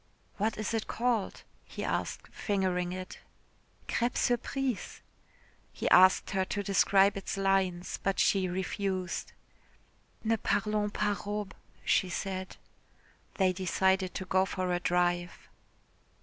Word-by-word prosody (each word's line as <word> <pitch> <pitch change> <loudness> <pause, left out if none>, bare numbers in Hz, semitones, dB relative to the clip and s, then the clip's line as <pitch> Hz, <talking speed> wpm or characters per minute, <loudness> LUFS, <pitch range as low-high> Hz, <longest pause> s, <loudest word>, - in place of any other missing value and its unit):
"What 215 +2 0
is 215 +1 -2
it 225 -1 -1
called?" 235 -4 -1 0.2
he - - -7
asked - - -3
fingering 185 -3 -1
it. 185 0 -7 0.7
"Crêpe 240 +1 0
surprise." 245 0 -1 0.7
He - - -3
asked 185 +1 +6
her 190 -1 +1
to 200 +2 -3
describe 195 0 +4
its 195 0 -4
lines, 190 -2 0
but 195 -1 0
she 190 -2 +3
refused. 185 0 -2 0.9
"Ne 225 0 +2
parlons 210 0 0
pas 205 -3 -1
robes," 205 -1 -3 0.3
she 185 - +2
said. 185 +1 -4 0.8
They 185 -2 +3
decided 190 0 +1
to 190 - -4
go 185 0 +3
for 185 -2 -2
a 175 - +1
drive. 175 0 0
190 Hz, 120 wpm, -30 LUFS, 185-205 Hz, 0.9 s, asked